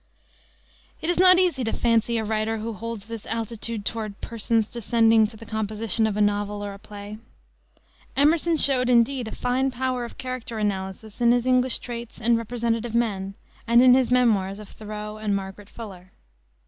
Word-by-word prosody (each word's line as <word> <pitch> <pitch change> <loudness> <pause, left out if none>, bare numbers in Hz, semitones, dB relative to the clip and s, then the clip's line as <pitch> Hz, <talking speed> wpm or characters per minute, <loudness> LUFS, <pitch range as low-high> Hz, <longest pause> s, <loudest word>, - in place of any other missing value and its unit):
It 330 - 0
is 350 - -1
not 365 0 +8
easy 350 -8 +2
to 225 - -1
fancy 230 0 +1
a 220 - -1
writer 220 +1 -1
who 225 +1 -4
holds 225 0 -6
this 230 -1 -8
altitude 230 -1 -4
toward 215 -3 -4
"persons" 225 -1 0
descending 225 -1 +3
to 220 +1 -12
the 225 - -11
composition 220 0 -1
of 210 -1 -2
a - - +1
novel 205 0 0
or 200 - -5
a 200 - -12
play. 205 +1 -9 1.0
Emerson 325 +3 +4
showed, 260 -4 +3
indeed, 245 0 +3
a - - -6
fine 255 +2 0
power 255 -1 -2
of 235 - -8
character 255 -3 -5
analysis 205 +2 -4
in 235 0 +5
his 245 0 +2
English 255 0 +3
Traits 235 -1 -8
and 235 +1 +3
Representative 230 0 -2
Men 195 -4 -1 0.3
and 235 +2 +6
in 255 -1 +8
his 255 -1 +3
memoirs 215 -6 +2
of 210 -1 -11
Thoreau 210 0 -7
and 210 -2 0
Margaret 195 +1 -6
Fuller. 190 -5 -10
225 Hz, 175 wpm, -24 LUFS, 210-245 Hz, 1.0 s, not